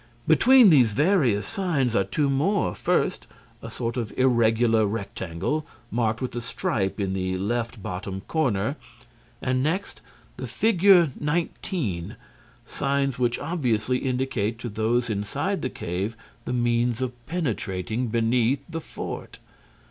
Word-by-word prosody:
Between 240 - +7
these 125 -8 +5
various 140 - +2
signs, 160 - 0
are 95 - +4
two 140 +10 0
more: 140 - +1
first, - - 0 0.3
a - - -7
sort 120 +1 -4
of 115 -3 -3
irregular 115 -3 +3
rectangle, 100 - -3 0.3
marked 115 0 0
with 125 - -4
a 120 - -2
stripe 110 -3 -2
in 95 -2 -1
the 95 -1 -1
left 115 +2 -2
bottom 95 +1 -5
corner, 135 -2 0 0.7
and, 130 0 +1
next, 170 +8 -2 0.4
the - - -5
figure 190 -6 +4
19, 150 - -2 0.5
signs 140 -2 -1
which 120 -1 +1
obviously 125 -6 0
indicate 125 -4 -1
to 120 +1 -5
those 115 +3 0
inside 105 -2 -2
the - - -1
cave 95 +6 -4 0.3
the - - -2
means 120 0 +1
of 125 -1 -3
penetrating 115 - -2
beneath 115 +3 +1
the 165 -1 -5
fort. - - -7
120 Hz, 130 wpm, -25 LUFS, 110-145 Hz, 0.7 s, Between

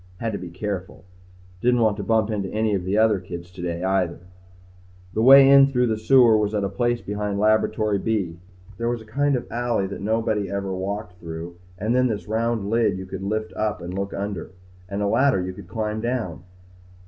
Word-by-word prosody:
Had 115 +3 -2
to 100 - -4
be 90 - -7
careful. 95 -1 -5 0.6
Didn't 125 0 +3
want 110 -2 +3
to 100 - -4
bump 110 +1 +1
into 100 -3 -2
any 110 0 0
of 95 -3 -1
the 95 +3 0
other 110 -2 +4
kids 85 -1 -9
today, 90 -1 -4
either. 95 -3 0 0.9
The 110 - 0
way 135 +3 +9
in 140 0 +8
through 125 -3 +1
the 110 -2 0
sewer 120 0 +5
was 105 0 0
at 105 - 0
a 100 - -1
place 120 +4 0
behind 105 0 -3
Laboratory 110 0 +2
B. 95 -7 -2 0.4
There 115 0 0
was 120 -2 -3
a - - -19
kind 140 +5 +1
of 125 - -2
an - - -19
alley 120 -4 0
there 95 - -6
that - - -8
nobody 110 -1 0
ever 100 -1 -3
walked 95 0 -5
through 85 +1 -7 0.2
and 110 +5 -1
then 125 0 +3
this 110 -3 -4
round 110 -1 -1
lid 110 -3 +1
you 95 - -6
could 95 0 -7
lift 110 +2 -3
up 110 -1 -2
and 90 +1 -7
look 100 +1 -3
under. 100 -3 -4 0.4
And 100 +1 -2
a - - +1
ladder 130 0 +3
you 90 0 -3
could 95 -1 -11
climb 110 +3 -3
down. 115 -9 -3
105 Hz, 215 wpm, -23 LUFS, 95-115 Hz, 0.9 s, way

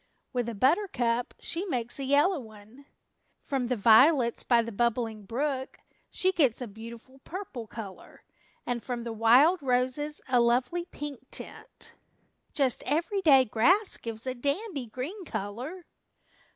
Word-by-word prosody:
With 245 -2 -1
a 230 - -5
buttercup 245 - +1
she 335 +2 -3
makes 245 - -3
a - - -3
yellow 290 +6 +3
one. 220 +4 -14 0.5
From 265 -3 -2
the 250 - 0
violets 235 +3 +5
by 235 -2 +3
the 230 - -6
Bubbling 225 -1 -1
Brook 265 +2 -2 0.3
she 375 - +1
gets 280 -11 +2
a 250 - -3
beautiful 230 +5 -11
purple 295 - -7
color, 205 -4 -10 0.4
and 245 -1 -2
from 245 -1 -4
the 230 -1 -4
wild 255 +11 +5
roses 260 +3 0
a 255 -2 +3
lovely 245 +9 +1
pink 290 -6 -8
tint. - - -9 0.6
Just 270 -4 0
every 335 +7 0
day 275 -7 +6
grass 355 - +3
gives 230 0 -5
a 255 - -1
dandy 280 - -3
green 290 - -6
color." 245 - -6
255 Hz, 140 wpm, -28 LUFS, 235-295 Hz, 0.6 s, day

